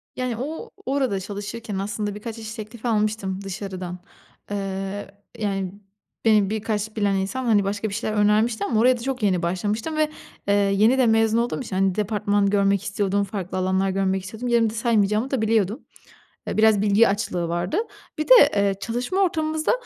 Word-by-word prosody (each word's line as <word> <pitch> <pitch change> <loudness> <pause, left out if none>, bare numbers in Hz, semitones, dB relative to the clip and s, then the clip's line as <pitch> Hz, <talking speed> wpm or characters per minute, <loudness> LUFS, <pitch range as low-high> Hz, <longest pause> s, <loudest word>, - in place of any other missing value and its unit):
Yani, 250 -3 -2
o 315 - -5 0.2
orada 265 -7 0
çalışırken 205 +2 -6
aslında 205 +1 -3
birkaç 220 +2 -7
iş 220 -1 -7
teklif 220 +1 -9
almıştım 210 -4 0
dışarıdan. 185 -2 -6 0.5
Eee, 195 0 -3 0.3
yani, 195 -4 -2 0.5
beni 210 -3 +4
birkaç 215 0 -2
bilen 205 -2 +1
insan, 195 +7 -2
hani, 215 -4 +4
başka 205 +2 -2
bir - - -7
şeyler 215 0 -2
önermişti 210 +1 +2
ama 215 +1 +1
oraya 250 +1 +4
da - - -9
çok 260 -1 -3
yeni 185 -4 +2
başlamıştım 210 - -2
ve, 310 -1 +2 0.4
eee, 200 - +3
yeni 205 +5 +3
de 260 - +4
mezun 225 0 +3
olduğum 240 +3 0
için, 220 -7 -5
hani, 190 -1 +2
departman 205 -1 +1
görmek 200 -1 +2
istiyordum, 200 0 0
farklı 195 -2 -5
alanlar 190 +1 +1
görmek 190 0 0
istiyordum. 220 +6 -6
Yerimde 230 -2 +2
saymayacağımı 225 0 +1
da 265 -4 0
biliyordum. 220 +1 +1 0.6
Eee, - - -3
biraz 215 -2 +4
bilgi 210 +2 +5
açlığı 195 -4 -1
vardı. 175 - -1 0.4
Bir 310 - -2
de, - - +10 0.2
eee, 200 -1 +2
çalışma 245 - -2
ortamımızda, 315 -4 +1
210 Hz, 170 wpm, -23 LUFS, 195-230 Hz, 0.6 s, de